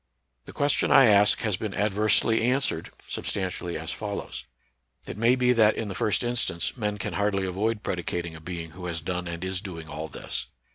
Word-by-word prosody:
The - - -10
question 145 0 +1
I 135 - +8
ask 105 -2 +5
has 105 -5 0
been 105 -1 -4
adversely 110 +3 +3
an 130 +2 +3
swered, 85 -11 -1 0.2
substantially 90 -3 -3
as 80 +1 -5
follows: 105 -1 -5 0.6
It - - -6
may 115 +4 +4
be 125 -1 +3
that 110 -2 +5
in 110 - -3
the - - -3
first 105 +4 +1
instance 120 -8 -1
men 105 -4 -2
can - - -4
hardly 100 -1 +1
avoid 105 +4 -1
pred 90 -2 -2
icating 85 -1 -3
a 80 - -11
being 85 -1 -6
who 90 +1 -7
has 85 -1 -3
done 90 +2 -3
and 85 +1 -5
is 95 -1 -2
doing 85 -6 -7
all 80 +1 -5
this. - - -5
100 Hz, 200 wpm, -26 LUFS, 85-110 Hz, 0.6 s, I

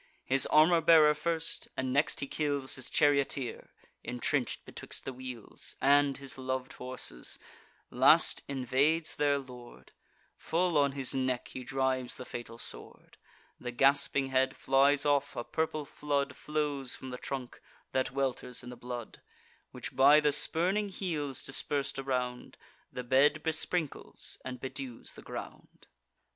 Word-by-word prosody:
His 135 0 +6
armour 165 +2 +5
bearer 155 -2 +7
first, 165 +1 -1
and 130 -1 -1
next 145 +1 +1
he - - -1
kills 145 -2 -1
His 130 - -5
charioteer, 140 -3 +1 0.3
intrench'd 125 +2 -1
betwixt - - -6
the 135 - -4
wheels 125 -3 -7
And 140 0 +4
his 135 -1 -7
lov'd 130 0 -3
horses; 125 - -5 0.5
last - - +5
invades 140 +4 +1
their 145 -1 +2
lord; 125 - -11 0.5
Full 175 0 0
on 140 -2 +3
his 135 -2 -3
neck 130 -2 -1
he 130 - -7
drives 130 -1 -1
the 125 - -7
fatal 120 -2 -7
sword: - - -7 0.4
The 125 - -5
gasping 135 +1 +2
head 130 0 +1
flies 140 +2 +3
off; 145 -1 +1
a 120 - -3
purple 155 0 -2
flood 140 -2 -2
Flows 145 -4 -2
from 130 - -8
the 125 - -6
trunk, 130 -3 -6 0.3
that 130 - 0
welters 130 -2 -2
in 125 - -8
the - - -8
blood, 120 -2 -7 0.5
Which, - - -7
by 140 +3 +7
the 150 -1 +2
spurning 180 +8 +1
heels 155 -8 -3
dispers'd 135 0 -2
around, 125 -2 -3 0.3
The 125 - -5
bed 140 +4 +3
besprinkles 160 0 -2
and 130 -1 -6
bedews 130 -2 -6
the - - -12
ground. - - -9
135 Hz, 140 wpm, -31 LUFS, 130-145 Hz, 0.5 s, bearer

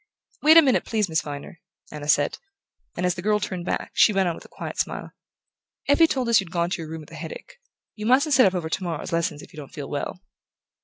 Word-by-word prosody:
"Wait 315 +2 +7
a 330 - +9
minute, 265 -3 +3
please, 215 -3 0
Miss 160 -2 0
Viner," 145 +3 -8 0.3
Anna 150 -1 -7
said; 145 0 +2 0.6
and 180 - -1
as 180 - +2
the 175 - -7
girl 210 +2 +2
turned 185 -3 -4
back, - - -3
she - - +5
went 195 -2 +1
on 170 - 0
with - - -11
her - - -15
quiet - - -7
smile: - - -3 0.8
"Effie 290 +4 +5
told 260 -5 -1
us 235 -1 +5
you'd 190 -3 -5
gone 170 0 -1
to 180 - -2
your 160 - -7
room 160 0 -6
with 155 - -15
a - - -9
headache. - - -9 0.4
You 210 0 -4
mustn't 280 +5 +4
sit 255 -5 +7
up 190 - -1
over 170 -3 -2
tomorrow's 170 0 -3
lessons 165 -3 -1
if - - -15
you - - -14
don't 145 -3 -9
feel 145 -6 -7
well." 145 +4 -4
180 Hz, 245 wpm, -24 LUFS, 160-230 Hz, 0.8 s, a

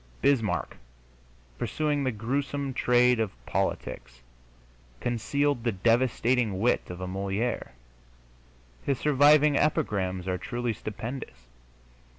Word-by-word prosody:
Bismarck, 130 -7 +1 0.8
pursuing 150 -2 0
the 130 - +1
gruesome 135 +5 -2
trade 125 -1 +3
of 110 -2 +1 0.2
politics, 65 0 -3 0.8
concealed 130 - 0
the 120 - +1
devastating 115 +1 +2
wit 120 +4 +1
of 90 +1 -7
a 95 - -3
Molière; 100 - -2 1.1
his 140 -2 0
surviving 150 +1 +5
epigrams 95 -11 0
are 90 -1 -1
truly 120 -1 -2
stupendous. 110 - -7
120 Hz, 100 wpm, -27 LUFS, 100-140 Hz, 1.1 s, surviving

